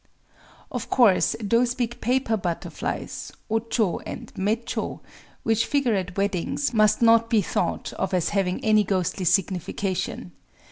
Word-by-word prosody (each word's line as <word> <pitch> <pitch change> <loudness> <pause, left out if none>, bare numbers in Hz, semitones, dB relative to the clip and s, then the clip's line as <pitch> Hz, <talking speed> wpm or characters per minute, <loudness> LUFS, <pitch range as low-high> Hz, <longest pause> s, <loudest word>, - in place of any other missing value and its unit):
—Of - - -4
course 230 -8 +4
those 235 +3 +2
big 240 -1 -3
paper 250 -1 +1
butterflies 175 -5 -4 0.2
(o 225 - +3
chō 220 -5 -1
and - - -8
mé 215 +5 -1
chō) - - -4 0.4
which 225 0 +1
figure 275 -5 +1
at 185 -2 -2
weddings 200 +7 -1
must 215 +1 +3
not 230 0 +5
be 220 -3 +3
thought - - -2
of 190 - -2
as 180 -3 +1
having 190 -1 -1
any 215 -1 +5
ghostly 185 -1 -1
signification. 185 0 -1
210 Hz, 140 wpm, -25 LUFS, 185-230 Hz, 0.4 s, not